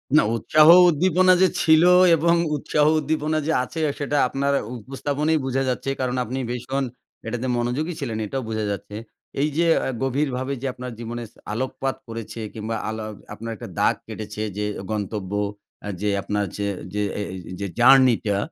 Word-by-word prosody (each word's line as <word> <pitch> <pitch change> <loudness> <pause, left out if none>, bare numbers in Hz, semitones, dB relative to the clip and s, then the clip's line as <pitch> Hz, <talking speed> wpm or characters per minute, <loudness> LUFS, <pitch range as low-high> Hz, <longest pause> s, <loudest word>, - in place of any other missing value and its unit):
না, 155 - +7
উৎসাহ 155 +6 +4 0.2
উদ্দীপনা 185 +3 +4
যে 190 - +7
ছিল 160 0 +5 0.3
এবং 170 +2 +3 0.2
উৎসাহ 150 +1 +1
উদ্দীপনা 155 +1 -1
যে - - +2
আছে 145 +6 -6 0.2
সেটা 145 0 -1
আপনার 140 +2 0 0.3
উপস্থাপনেই 145 +6 -1
বুঝা 135 0 0
যাচ্ছে। 125 +2 -2
কারণ 130 -1 -1
আপনি 130 +4 -4
ভীষণ 125 +3 -2 0.4
এটাতে 120 +1 -3
মনোযোগী 125 +8 -1
ছিলেন। 120 -7 -3
এটাও 130 +5 -3
বুঝা 110 -1 -2
যাচ্ছে। 100 +1 -6 0.5
এই 150 - +2
যে 170 - +3 0.2
আ - - -1
গভীরভাবে 135 0 -1
যে 135 - -2
আপনার 125 0 -7
জীবনে 120 -1 -6 0.2
আলোকপাত 130 +3 -2
করেছে 115 0 -7
কিংবা 110 +1 -4
আলো 110 0 -4 0.3
আপনার 115 +1 -6
একটা - - -9
দাগ - - +3
কেটেছে 105 0 -6 0.2
যে 105 - -1 0.3
গন্তব্য 105 -2 -3 0.5
অ্যা 105 - -4
যে 105 - +1
আপনার 105 +1 -1
যে 100 0 -1 0.3
যে 105 - -1 0.2
এ - - -2
এ - - -5 0.2
যে 100 - -2
জার্নি 130 0 +7
টা 100 -2 +1
130 Hz, 165 wpm, -23 LUFS, 110-145 Hz, 0.5 s, না